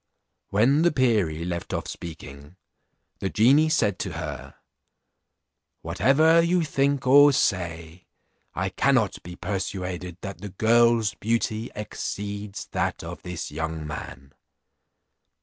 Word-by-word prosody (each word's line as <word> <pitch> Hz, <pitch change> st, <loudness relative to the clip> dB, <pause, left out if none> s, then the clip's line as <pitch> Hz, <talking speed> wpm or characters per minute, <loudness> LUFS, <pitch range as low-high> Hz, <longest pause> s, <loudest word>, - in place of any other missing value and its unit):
When 125 Hz, +9 st, +3 dB
the 175 Hz, +1 st, +4 dB
perie 105 Hz, -, +1 dB
left 85 Hz, -1 st, -4 dB
off -, -, -4 dB
speaking, 70 Hz, -1 st, -9 dB, 0.6 s
the 95 Hz, -, -2 dB
genie 140 Hz, +10 st, +4 dB
said 105 Hz, -, +1 dB
to 95 Hz, -, -4 dB
her, 75 Hz, -5 st, -6 dB, 1.3 s
"Whatever 160 Hz, +5 st, +4 dB
you 170 Hz, +1 st, +2 dB
think 140 Hz, -3 st, 0 dB
or 145 Hz, +3 st, +7 dB
say, 85 Hz, -, -2 dB, 0.5 s
I -, -, -1 dB
cannot -, -, +1 dB
be 90 Hz, +1 st, -9 dB
persuaded 90 Hz, -1 st, -4 dB
that 100 Hz, -1 st, -7 dB
the 105 Hz, -, -6 dB
girl's 115 Hz, +2 st, +3 dB
beauty 115 Hz, +1 st, -1 dB
exceeds 105 Hz, -1 st, -5 dB
that -, -, -2 dB
of -, -, -8 dB
this 90 Hz, -4 st, -6 dB
young 80 Hz, +1 st, -4 dB
man." 70 Hz, -2 st, -8 dB
100 Hz, 115 wpm, -25 LUFS, 85-125 Hz, 1.3 s, or